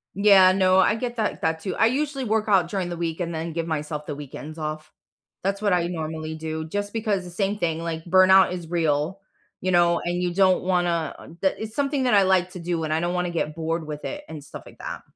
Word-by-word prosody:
Yeah, 195 -2 +7
no, 185 -1 +4
I 190 +3 +4
get 240 +1 -4
that 220 -2 -1
that, 160 0 0
too; 180 +2 -4
I - - +4
usually 275 +3 0
work 220 -2 0
out 190 -5 +3
during 185 -2 -2
the 175 - -5
week 165 0 -3
and 170 -1 -3
then 160 +1 -4
give 165 0 -3
myself 150 -1 -3
the 145 - -5
weekends 150 +2 -9
off. 155 0 -5 0.5
That's 195 +2 -1
what 205 -1 +1
I 175 -1 +2
normally 160 -2 -4
do 160 0 -4
just 205 +5 -3
because 215 -4 -1
the 180 - -9
same 195 +3 -1
thing, 165 -2 0
like, 165 -1 -4
burnout 185 +1 +6
is 175 -2 -5
real, 165 +2 0 0.4
you 185 - 0
know, 175 -1 +4
and 175 +1 -1
you 175 -1 -1
don't 185 0 +3
wanna 175 -4 0 0.3
that 190 - +2
it's 220 0 -6
something 280 -1 0
that 250 - +2
I 200 - +6
like 185 -1 +2
to 180 - -8
do, 170 -1 -2
and 155 -1 -1
I 160 - +1
don't 175 +1 -1
wanna 180 0 -1
get 155 -3 -2
bored 165 0 -2
with 150 -1 -7
it 295 0 -5
and 155 -2 -8
stuff 145 - -10
like - - -15
that. - - -6
175 Hz, 240 wpm, -24 LUFS, 160-195 Hz, 0.5 s, Yeah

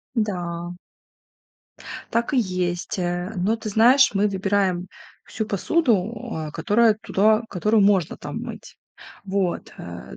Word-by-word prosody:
Да. 175 -5 -2 1.4
Так 235 +4 0
и - - +3
есть, 185 -1 -1
э, 175 +2 -2
но, 195 +5 +1
ты 220 -1 -6
знаешь, 250 +6 +5
мы 200 +1 +2
выбираем 190 -2 0 0.4
всю 220 - -4
посуду, 220 - +1 0.2
а, 155 -1 -4
которая 215 +7 +3
туда 215 +3 +3
которую 210 +3 +2
можно 190 -5 +2
там - - -6
мыть. - - -9 0.5
Вот, 190 -2 -2
э, 85 -6 -9
195 Hz, 125 wpm, -23 LUFS, 175-220 Hz, 1.4 s, знаешь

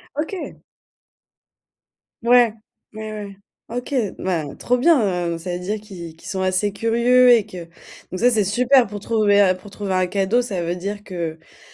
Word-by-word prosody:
OK. 325 +5 -5 1.6
Ouais, 240 -2 +5 0.4
ouais, 215 0 -6
ouais. 200 -2 -8 0.3
OK, 245 +4 -5 0.2
ben 165 -6 -3
trop 250 +1 +1
bien, 210 - +2
heu, - - -5
ça 175 +2 -5
veut - - -5
dire 210 +3 -2
qu'ils 180 -6 -10
qu'ils - - -13
sont 190 - -3
assez 185 +2 0
curieux 240 +3 +4
et 225 -4 +5
que 180 -5 -9 0.5
donc 185 - -4
ça, 245 - +5
c'est 215 -2 +2
super 245 +5 +3
pour 205 +1 -7
trouver 205 -3 +3
pour 205 - -12
trouver 200 -1 -4
un 185 0 +2
cadeau. 195 +5 +1
Ça 205 -7 -3
veut 170 +1 -2
dire 200 +3 -4
qu'en 165 -3 -7
205 Hz, 170 wpm, -21 LUFS, 185-235 Hz, 1.6 s, Ouais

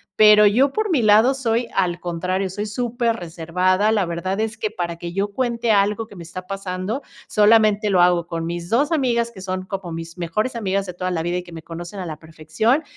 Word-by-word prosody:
Pero 210 0 +7
yo, 255 +7 +4
por 430 -2 -1
mi 295 -7 +3
lado 220 +4 +5
soy, 240 -3 -1
al 175 -2 0
contrario, 185 +2 -2
soy 205 +3 -4
súper 235 +1 -1
reservada, 180 +3 0
la 205 -4 +2
verdad 170 +3 -3
es 220 0 -3
que, 215 - -2
para 175 -5 -4
que 170 0 -7
yo 200 +2 -1
cuente 235 -1 0
algo 210 +2 +2
que 200 - -14
me 170 - -8
está 185 +2 -8
pasando, 195 +5 -4 0.3
solamente 215 0 +4
lo 185 -3 +4
hago 175 -1 +3
con 165 -1 -4
mis 170 0 -4
2 280 +7 +2
amigas, 240 -6 +1
que 210 - -13
son 185 0 -4
como 190 -3 -5
mis 165 +1 -7
mejores 195 +9 -2
amigas 195 -2 -1
de 180 - -6
toda 180 +1 -3
la 165 -2 -1
vida 175 +1 -1
y 180 - -4
que 175 -1 -13
me 160 -1 -9
conocen 175 +4 -8
a - - -5
la 155 -3 -6
perfección, 160 - -1
195 Hz, 220 wpm, -21 LUFS, 175-225 Hz, 0.3 s, Pero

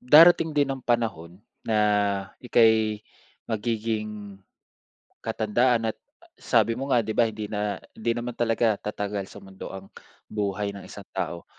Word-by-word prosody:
darating 160 +3 +7
din 140 -2 +3
ang 135 - -6
panahon 110 -9 -1 0.3
na 110 - +2 0.6
ika'y 110 -3 +3 0.4
magiging 105 -3 -3 0.8
katandaan 115 +1 +1
at - - -38 0.4
sabi 115 -1 +3
mo 135 +4 -4
nga, 120 -5 +3
di 110 - -2
ba, 115 -2 +3
hindi 105 -1 -5
na 105 0 -2 0.2
hindi 115 +1 -1
naman 120 0 -4
talaga 115 -1 +2
tatagal 105 -1 -4
sa - - -12
mundo 95 -1 -9
ang 95 0 -10 0.3
buhay 100 -1 -2
ng 100 - -8
isang - - -11
tao. 85 -1 -3
110 Hz, 140 wpm, -26 LUFS, 105-120 Hz, 0.8 s, darating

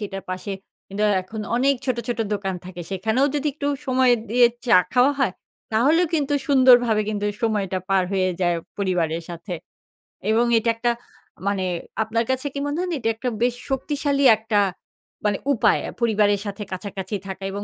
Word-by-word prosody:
সেটার 195 -2 -5
পাশে 185 +2 -4 0.4
কিন্তু 200 +2 -3 0.2
এখন 215 +4 -7 0.2
অনেক 275 +3 +3
ছোট, 255 -2 +1
ছোট 240 - -2 0.2
দোকান 195 -2 -3
থাকে। 180 -1 -8
সেখানেও 220 +8 +1
যদি 295 +1 -1
একটু 285 - -4 0.2
সময় 255 -1 +4 0.2
দিয়ে 245 0 +6 0.2
চা 225 - +6 0.2
খাওয়া 255 +3 +4
হয়, 245 -9 +2 0.4
তাহলেও 300 +11 +4
কিন্তু 290 -2 +1
সুন্দরভাবে 245 -5 +5
কিন্তু 205 -1 -2 0.2
সময়টা 200 -4 0
পার 195 -1 +3
হয়ে 185 -1 +2
যায় 175 -1 +2 0.2
পরিবারের 170 -4 0
সাথে। 170 +2 -7 0.8
এবং 230 +2 +3
এটা 230 +1 +1
একটা 240 +1 +1 0.6
মানে 200 -2 0 0.4
আপনার 230 +1 0
কাছে 260 +2 -2
কি 280 - -3
মনে 290 +2 -2
হয় 365 - -1
না, 335 - -1
এটা 225 -1 0
একটা 250 +2 -2
বেশ 245 0 +2
শক্তিশালী 280 +1 0
একটা 220 -1 0 0.7
মানে 205 -2 +2 0.2
উপায় 235 - +3
আ - - -7
পরিবারের 205 -3 +2
সাথে 205 +1 -5
কাছাকাছি 190 +1 -5
থাকা 190 0 -7
এবং 200 +1 -4
220 Hz, 170 wpm, -23 LUFS, 195-255 Hz, 0.8 s, দিয়ে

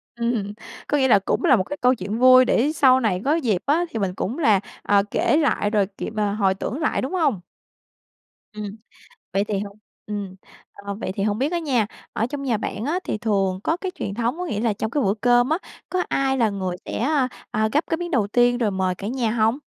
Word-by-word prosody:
Ừm. 235 -4 -1 0.3
Có 295 - +1
nghĩa 265 -2 +3
là 225 - +6
cũng 195 - -1
là 265 - +6
một 190 - +1
cái 290 +9 -6
câu 250 +1 +4
chuyện 205 +1 -4
vui 255 0 +7
để 260 +4 +2
sau 260 -4 +5
này 205 -7 0
có 295 +3 +3
dịp 225 - 0
á 320 +5 +2
thì 225 - -4
mình 195 -3 -1
cũng 225 +7 -3
là, 215 - +4 0.2
ờ, 200 -1 +3
kể - - +2
lại 270 -9 +1
rồi, 210 -2 +2
kiểu, - - -4
mà 210 -2 0
hồi 200 -2 +2
tưởng 210 +7 -4
lại, 310 - 0
đúng 265 +7 -4
hông? 285 - +1 1.1
Ừm. 210 0 -6 0.6
Vậy 195 +1 +1
thì 210 -2 -2
hông 200 0 -6 0.3
ừm, 205 -3 -5 0.4
ờ, 200 0 -7
vậy 200 -2 -4
thì 195 - -2
hông 205 +1 0
biết 280 +6 0
á 345 - +1
nha, 260 -10 +1 0.3
ở 225 - 0
trong 275 +2 -5
nhà 250 -5 0
bạn 210 0 -4
á 315 +7 0
thì - - -2
thường 195 -4 0
có 320 - +1
cái 375 +1 -4
truyền 195 - -4
thống, 240 +7 -1
có 360 - -3
nghĩa 215 -10 -2
là 225 -1 +1
trong 220 +2 -3
cái 290 +3 0
bữa 195 -3 +2
cơm 245 +2 +3
á, 315 - +2 0.3
có 365 -1 +1
ai 270 -1 +1
là 225 -3 +3
người 185 -3 -3
sẽ, - - -4
a, 270 +1 +1 0.2
a, 215 +1 +1
gắp 300 - +2
cái 325 - +2
miếng 345 +1 -5
đầu 235 - +2
tiên 245 +3 +3
rồi 225 -4 +1
mời 190 -1 0
cả 195 - -7
nhà 240 -2 -1
hông? 225 +2 +2
230 Hz, 245 wpm, -23 LUFS, 205-270 Hz, 1.1 s, vui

